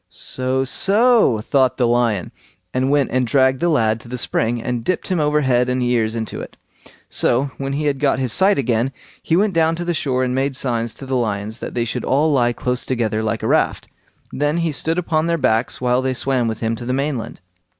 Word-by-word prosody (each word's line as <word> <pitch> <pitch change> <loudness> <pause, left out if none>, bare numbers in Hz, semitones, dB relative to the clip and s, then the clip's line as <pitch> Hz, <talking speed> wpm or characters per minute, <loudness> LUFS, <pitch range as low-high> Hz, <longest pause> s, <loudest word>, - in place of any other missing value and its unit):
"So, 130 +1 -2
so!" 205 - +3
thought 130 +2 +1
the 125 - +2
lion, 115 -5 +1 0.4
and 130 +1 0
went 145 -2 +2
and 125 -1 +1
dragged 130 +1 +3
the 175 - +1
lad 110 -7 +2
to 115 - -14
the 125 +1 -5
spring, 120 0 -1
and 120 0 -3
dipped 185 +5 -2
him 185 -3 0
over 150 0 +2
head 125 -2 +2
and 125 0 0
ears 115 -2 +1
in 115 - -1
it. - - -8 0.5
So, 130 +3 +1
when 135 0 -3
he 150 +2 -2
had 140 -2 0
got 140 -2 +2
his 130 -3 0
sight 195 +2 +4
again, 125 -1 0 0.3
he 165 - 0
went 200 +2 +2
down 165 0 +2
to 175 +1 -5
the 175 - 0
shore 130 -5 0
and 125 -1 -1
made 135 +1 -1
signs 120 -3 -2
to 135 - -10
the 130 0 -2
lions 110 -2 -2
that - - -7
they 120 -1 0
should 115 - -3
all 150 +4 +2
lie 120 -3 +3
close 125 +1 -2
together 115 -4 -1
like 110 -1 -2
a - - 0
raft; - - +1 0.4
then 145 +3 0
he 165 - 0
stood 160 +3 -1
upon 165 -2 0
their 170 0 +1
backs 115 -5 0
while 125 0 +1
they 130 0 -1
swam 130 -2 0
with 110 -1 -4
him 115 0 0
to 120 - -7
the 125 - -1
mainland. 135 -3 -3
130 Hz, 225 wpm, -20 LUFS, 120-145 Hz, 0.5 s, sight